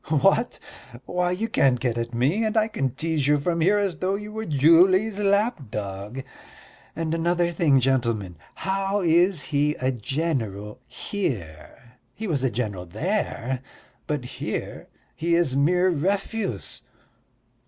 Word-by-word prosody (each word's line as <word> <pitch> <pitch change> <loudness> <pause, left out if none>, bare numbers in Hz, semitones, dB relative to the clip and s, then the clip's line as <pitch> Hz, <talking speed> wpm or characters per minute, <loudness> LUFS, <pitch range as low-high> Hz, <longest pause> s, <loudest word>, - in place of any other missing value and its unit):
"What? 195 - +2 0.5
Why, 180 +3 0
you 190 +5 -1
can't 130 - +3
get 120 -2 -1
at 115 0 -3
me, 135 - +1
and 220 0 0
I 215 0 +4
can 135 - -2
tease 155 -1 -1
you 150 0 +4
from 165 +3 -1
here 195 +6 +4
as 195 -6 0
though 190 +1 0
you 210 +1 -6
were 220 +1 -4
Julie's 180 +8 +4
lapdog. 135 - -1 0.7
And 160 -1 -2
another 170 +1 +1
thing, 155 -5 +3
gentlemen, 115 -9 0 0.2
how 195 +1 -1
is 175 -1 +3
he 150 +1 +1
a 130 +1 0
general 115 -5 -3
here? 120 - -5 0.2
He 220 - -5
was 145 -7 0
a 130 - +3
general 100 -6 -3
there, 130 - -2 0.5
but 145 -5 -2
here - - -5 0.3
is 170 -4 +2
mere 180 +6 +3
refuse." 195 - -2
155 Hz, 135 wpm, -24 LUFS, 125-190 Hz, 0.7 s, I